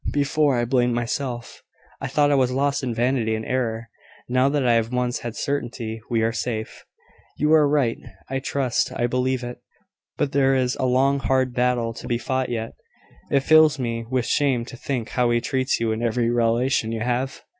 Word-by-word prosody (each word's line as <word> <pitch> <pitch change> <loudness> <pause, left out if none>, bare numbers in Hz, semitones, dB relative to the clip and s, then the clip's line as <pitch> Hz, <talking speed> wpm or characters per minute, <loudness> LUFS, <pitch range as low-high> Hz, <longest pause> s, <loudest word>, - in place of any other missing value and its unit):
Before, 145 -1 +2
I 120 - +1
blamed 125 -1 +1
myself 120 0 -4 0.4
I 135 - -2
thought 145 +2 +2
I - - +4
was 130 -2 +2
lost 140 +2 0
in 130 -3 -2
vanity 115 -1 0
and 110 0 -5
error: 115 -3 -2 0.4
now 130 +2 +2
that 140 -2 0
I 120 - +4
have 115 0 +1
once 125 0 -1
had 120 -2 -6
certainty, 120 -5 -3
we 115 -2 +1
are 115 - +2
safe." 115 -1 -4 0.5
"You 150 +2 +2
are 155 -2 +6
right, 140 -6 +1 0.3
I 135 0 -2
trust 135 -2 -1
I 120 - 0
believe 125 +1 0
it. 120 0 -7 0.6
But 145 -2 0
there 135 -1 +3
is 130 -1 +1
a 130 - +1
long 135 +2 +2
hard 130 -2 +1
battle 120 -2 0
to 120 - -9
be 120 - 0
fought 130 +2 -2
yet. 115 -2 -3 0.6
It 140 - +3
fills 155 0 +5
me 115 -3 -3
with 130 -2 0
shame 135 -5 +1
to 125 - -10
think 120 -2 -4
how 125 -1 +1
she 120 - +3
treats 130 +2 -1
you 115 -1 0
in 110 +1 -2
every 120 0 +1
relation 120 0 +1
you 115 -1 -3
have. 125 +3 -2
125 Hz, 200 wpm, -23 LUFS, 115-135 Hz, 0.6 s, are